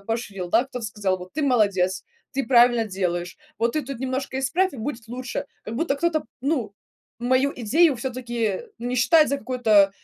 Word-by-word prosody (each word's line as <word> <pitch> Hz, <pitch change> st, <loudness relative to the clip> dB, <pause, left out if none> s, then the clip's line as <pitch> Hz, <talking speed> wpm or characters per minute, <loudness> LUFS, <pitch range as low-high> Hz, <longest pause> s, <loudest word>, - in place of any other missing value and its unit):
поощрил, 205 Hz, -6 st, -3 dB
да. 235 Hz, +6 st, +3 dB
Кто-то 250 Hz, -4 st, -6 dB
сказал: 200 Hz, -3 st, -1 dB
"Вот 180 Hz, 0 st, -11 dB
ты 310 Hz, -, -2 dB
молодец, 200 Hz, -8 st, +2 dB, 0.3 s
ты 275 Hz, -1 st, -2 dB
правильно 240 Hz, -2 st, +5 dB
делаешь. 180 Hz, -3 st, -2 dB, 0.2 s
Вот 230 Hz, +1 st, +1 dB
ты 305 Hz, -, 0 dB
тут 275 Hz, -2 st, -6 dB
немножко 265 Hz, +1 st, -3 dB
исправь, 330 Hz, +7 st, +1 dB
и -, -, -9 dB
будет 230 Hz, -1 st, -5 dB
лучше". 250 Hz, +1 st, -4 dB, 0.2 s
Как 220 Hz, -, -5 dB
будто 285 Hz, +1 st, 0 dB
кто-то, 315 Hz, 0 st, +1 dB, 0.2 s
ну, 255 Hz, -7 st, -1 dB, 0.5 s
мою 260 Hz, +3 st, +2 dB
идею 275 Hz, +5 st, +3 dB
всё-таки, 235 Hz, -4 st, -2 dB, 0.2 s
не 245 Hz, +2 st, -3 dB
считает 305 Hz, +6 st, +5 dB
за 280 Hz, -, 0 dB
какую-то 220 Hz, -5 st, +3 dB
245 Hz, 175 wpm, -24 LUFS, 215-270 Hz, 0.5 s, правильно